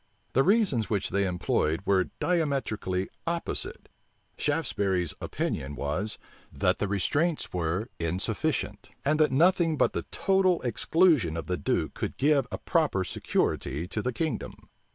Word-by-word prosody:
The 135 Hz, -, +5 dB
reasons 180 Hz, -, +2 dB
which 100 Hz, -3 st, -1 dB
they 100 Hz, +1 st, +1 dB
employed 85 Hz, -2 st, 0 dB
were 95 Hz, -2 st, +3 dB
diametrically 135 Hz, -, 0 dB, 0.2 s
opposite. 170 Hz, 0 st, -3 dB, 0.5 s
Shaftesbury's 100 Hz, -, 0 dB
opinion 70 Hz, +2 st, -3 dB
was, 85 Hz, +11 st, -2 dB, 0.3 s
that -, -, +1 dB
the 105 Hz, -, 0 dB
restraints 145 Hz, -, 0 dB
were 90 Hz, +5 st, -1 dB
insufficient; 85 Hz, +2 st, -2 dB, 0.2 s
and 150 Hz, +2 st, +2 dB
that 155 Hz, -3 st, +4 dB
nothing 165 Hz, +2 st, +3 dB
but -, -, +2 dB
the -, -, -3 dB
total 190 Hz, -2 st, +2 dB
exclusion 125 Hz, -, +3 dB
of 85 Hz, -, -4 dB
the 90 Hz, -, -1 dB
duke -, -, -1 dB
could -, -, -4 dB
give 140 Hz, -2 st, +3 dB
a -, -, -3 dB
proper 155 Hz, -, +1 dB
security 80 Hz, -3 st, -1 dB
to 105 Hz, -, -2 dB
the 125 Hz, -, -1 dB
kingdom. 160 Hz, +5 st, -4 dB
115 Hz, 135 wpm, -28 LUFS, -, 0.5 s, The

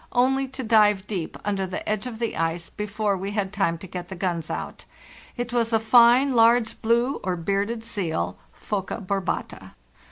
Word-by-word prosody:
only 265 Hz, +2 st, +2 dB
to 265 Hz, 0 st, -7 dB
dive 210 Hz, -3 st, +4 dB
deep 185 Hz, -6 st, -4 dB
under 195 Hz, -2 st, -1 dB
the 185 Hz, -, -4 dB
¢ -, -, -7 dB
lge 215 Hz, +3 st, -2 dB
of 235 Hz, -3 st, -6 dB
the 230 Hz, 0 st, -2 dB
ice 165 Hz, +1 st, -2 dB
before 210 Hz, 0 st, -1 dB
we 195 Hz, +2 st, -4 dB
had 200 Hz, -1 st, -2 dB
time 195 Hz, -5 st, +1 dB
to 170 Hz, -, -10 dB
get 180 Hz, -1 st, -7 dB
the 190 Hz, -, -6 dB
guns 170 Hz, -3 st, -2 dB
ou. -, -, -4 dB, 0.6 s
It 245 Hz, 0 st, -4 dB
was 235 Hz, -1 st, +1 dB
a 225 Hz, -, +3 dB
fine, 240 Hz, +4 st, +5 dB
large 230 Hz, 0 st, +3 dB
blue 235 Hz, +4 st, +2 dB
or 185 Hz, -1 st, -1 dB
bearded 200 Hz, +6 st, -2 dB
seal 160 Hz, -, -2 dB, 0.2 s
(Phoca 200 Hz, +1 st, -3 dB
barbata). 195 Hz, -2 st, -3 dB
210 Hz, 185 wpm, -24 LUFS, 190-235 Hz, 0.6 s, fine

